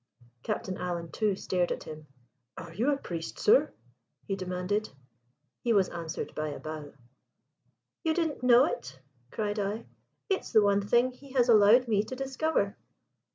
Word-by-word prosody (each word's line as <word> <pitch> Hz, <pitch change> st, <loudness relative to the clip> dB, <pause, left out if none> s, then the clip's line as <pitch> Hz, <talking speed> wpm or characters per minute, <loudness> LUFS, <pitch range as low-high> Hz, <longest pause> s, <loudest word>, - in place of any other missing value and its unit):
Captain 185 Hz, +8 st, -3 dB
Alan 170 Hz, -2 st, -4 dB
too 210 Hz, -3 st, +1 dB
stared 180 Hz, -2 st, -1 dB
at -, -, -3 dB
him. 155 Hz, -1 st, -10 dB, 0.5 s
"Are 165 Hz, 0 st, -8 dB
you 230 Hz, +10 st, +1 dB
a 280 Hz, -, +1 dB
priest, 170 Hz, -10 st, -6 dB
sir?" 455 Hz, +4 st, +4 dB, 0.5 s
he 195 Hz, -, -2 dB
demanded. 185 Hz, +3 st, -2 dB, 0.7 s
He 235 Hz, -, +2 dB
was 195 Hz, -3 st, +3 dB
answered 170 Hz, -1 st, -5 dB
by 155 Hz, 0 st, -2 dB
a 145 Hz, -, -5 dB
bow. 155 Hz, -2 st, -7 dB, 1.1 s
"You 320 Hz, -2 st, +1 dB
didn't 320 Hz, -6 st, -1 dB
know 250 Hz, +1 st, +6 dB
it?" 130 Hz, +2 st, -5 dB, 0.3 s
cried 210 Hz, -, -2 dB
I. 205 Hz, +3 st, -2 dB, 0.4 s
"It's 385 Hz, -2 st, -1 dB
the 215 Hz, -2 st, +6 dB
one 200 Hz, 0 st, +3 dB
thing 240 Hz, +5 st, +3 dB
he 265 Hz, +1 st, -15 dB
has 250 Hz, -2 st, +3 dB
allowed 225 Hz, +3 st, +6 dB
me 210 Hz, -3 st, +3 dB
to 255 Hz, -, -6 dB
discover." 270 Hz, -5 st, -1 dB
205 Hz, 155 wpm, -29 LUFS, 180-250 Hz, 1.1 s, know